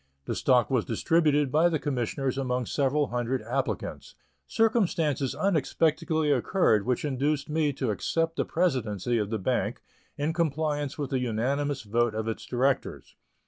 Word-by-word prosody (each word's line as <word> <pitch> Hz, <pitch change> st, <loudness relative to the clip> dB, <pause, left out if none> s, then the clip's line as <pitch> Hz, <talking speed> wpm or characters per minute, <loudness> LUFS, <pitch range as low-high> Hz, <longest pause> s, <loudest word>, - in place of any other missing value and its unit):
The -, -, -2 dB
stock 125 Hz, -1 st, +2 dB
was 125 Hz, -4 st, +2 dB
distributed 150 Hz, +3 st, +2 dB
by 160 Hz, +4 st, +4 dB
the 160 Hz, -, 0 dB
Commissioners 135 Hz, -1 st, -2 dB
among 125 Hz, -2 st, -1 dB
several 140 Hz, +2 st, 0 dB
hundred 125 Hz, +2 st, -2 dB
applicants. -, -, -3 dB, 0.3 s
Circumstances 170 Hz, -, +1 dB
unexpectedly 160 Hz, -3 st, +1 dB
occurred 125 Hz, -, +2 dB
which 125 Hz, +3 st, 0 dB
induced 145 Hz, +2 st, -1 dB
me 155 Hz, -1 st, +1 dB
to 130 Hz, -4 st, -1 dB
accept 165 Hz, -, -1 dB
the -, -, +1 dB
presidency 120 Hz, -, 0 dB
of 105 Hz, -1 st, -2 dB
the 110 Hz, -, -1 dB
bank, 95 Hz, -, -1 dB, 0.3 s
in 150 Hz, +3 st, -1 dB
compliance 150 Hz, -3 st, -1 dB
with 145 Hz, -3 st, -4 dB
the 130 Hz, -, +1 dB
unanimous 130 Hz, +4 st, -1 dB
vote 115 Hz, +1 st, 0 dB
of 110 Hz, 0 st, -2 dB
its 115 Hz, -, -4 dB
directors. 130 Hz, +2 st, -1 dB
140 Hz, 145 wpm, -27 LUFS, 125-155 Hz, 0.3 s, by